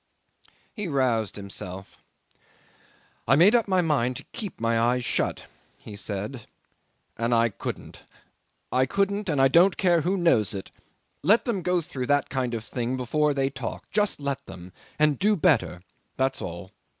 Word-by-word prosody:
'He 210 -4 -4
roused 125 - 0
himself. 95 -1 -7 1.3
'"I 135 - +5
made 180 - +6
up 235 -3 +3
my 185 -2 +3
mind 135 -7 +1
to - - -7
keep 205 -4 -6
my 115 0 +1
eyes 120 +1 +1
shut," - - -1 0.3
he 105 - -11
said, 105 +4 -5 0.7
"and 115 +1 +1
I 115 0 +3
couldn't. 100 - -7 0.7
I 130 +1 +2
couldn't, 200 0 0
and 145 -4 0
I 135 - +6
don't 170 +7 +4
care 175 -3 +3
who 185 +5 0
knows 115 - +2
it. 95 - -7 0.5
Let 210 +9 +4
them 220 -6 -1
go 180 0 +1
through 130 -5 -5
that 145 -1 +1
kind 130 -3 -1
of 115 -1 -5
thing 125 +1 -3
before 150 +4 +1
they 135 0 0
talk. 130 -3 -7
Just 210 -5 +1
let 140 -2 -3
them 90 0 -11 0.2
and 150 -2 +2
do 210 +2 +3
better 145 - +1 0.3
that's 130 0 0
all. 85 +1 -7
135 Hz, 160 wpm, -26 LUFS, 115-175 Hz, 1.3 s, made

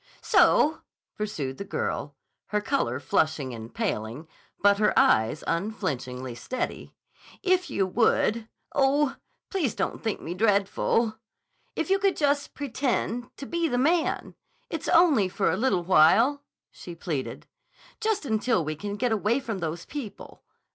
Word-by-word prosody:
"So," 340 -6 +4 0.3
pursued 155 - -4
the - - -3
girl, 200 - -3 0.3
her 210 - 0
color 275 +6 -1
flushing 155 - 0
and 115 0 -8
paling, 150 - -3 0.3
but 200 0 +4
her 210 - +2
eyes 110 +8 +3
unflinchingly 130 - -3
steady, 250 - -5 0.5
"if 365 -3 +2
you 195 -7 +1
would—oh, 245 +7 +1 0.4
please 330 - 0
don't - - -2
think 220 -2 -1
me 170 - -5
dreadful!—if 220 - -1
you 390 - +4
could 395 -1 +1
just 285 -1 0
pretend 245 -3 -2
to 275 - -7
be 340 +2 0
the 245 - -1
man! 320 +6 +1 0.4
It's 325 -2 -4
only 300 - +5
for 195 +1 +1
a - - 0
little 215 -8 +1
while," 190 - +5 0.3
she 175 - -10
pleaded. 155 -5 -4 0.5
"Just 435 -6 0
until 220 - +1
we 155 +1 -3
can 205 +5 -5
get 240 +3 0
away 220 +4 +1
from 225 -7 -4
those 165 0 -4
people. 270 -9 -8
220 Hz, 135 wpm, -26 LUFS, 175-275 Hz, 0.5 s, only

